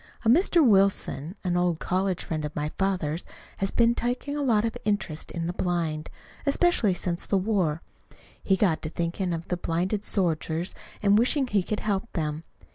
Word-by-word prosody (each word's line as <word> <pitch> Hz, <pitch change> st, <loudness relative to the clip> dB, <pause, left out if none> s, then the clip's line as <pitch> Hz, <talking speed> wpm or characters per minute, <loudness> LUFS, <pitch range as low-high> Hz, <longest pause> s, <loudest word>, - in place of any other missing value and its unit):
A -, -, +4 dB
Mr. 335 Hz, +3 st, +5 dB
Wilson, 190 Hz, -, +2 dB
an 180 Hz, -2 st, 0 dB
old 175 Hz, -2 st, +2 dB
college 185 Hz, +2 st, -1 dB
friend 155 Hz, -2 st, -3 dB
of 150 Hz, 0 st, -5 dB
my 150 Hz, +1 st, -1 dB
father's, 180 Hz, -4 st, -1 dB, 0.3 s
has 195 Hz, -, 0 dB
been 235 Hz, +2 st, +3 dB
taking 245 Hz, +4 st, -2 dB
a 295 Hz, -, -2 dB
lot 230 Hz, -6 st, +3 dB
of 230 Hz, -, -2 dB
interest 200 Hz, -7 st, -1 dB
in 165 Hz, -1 st, -3 dB
the 175 Hz, -, -2 dB
blind 165 Hz, -4 st, -2 dB, 0.3 s
especially 280 Hz, -, +2 dB
since 175 Hz, 0 st, -2 dB
the 200 Hz, -, +2 dB
war. 185 Hz, -6 st, 0 dB, 0.6 s
He 195 Hz, -, +3 dB
got 180 Hz, -5 st, +2 dB
to 155 Hz, -, -4 dB
thinking 170 Hz, +3 st, -2 dB
of 165 Hz, 0 st, -4 dB
the 180 Hz, -, 0 dB
blinded 180 Hz, +5 st, -1 dB
soldiers 170 Hz, -3 st, 0 dB, 0.3 s
and 205 Hz, +1 st, +5 dB
wishing 265 Hz, +4 st, +2 dB
he 210 Hz, -5 st, +1 dB
could 210 Hz, +3 st, -3 dB
help 205 Hz, +1 st, -1 dB
them. 155 Hz, -1 st, -2 dB
185 Hz, 180 wpm, -26 LUFS, 165-210 Hz, 0.6 s, Mr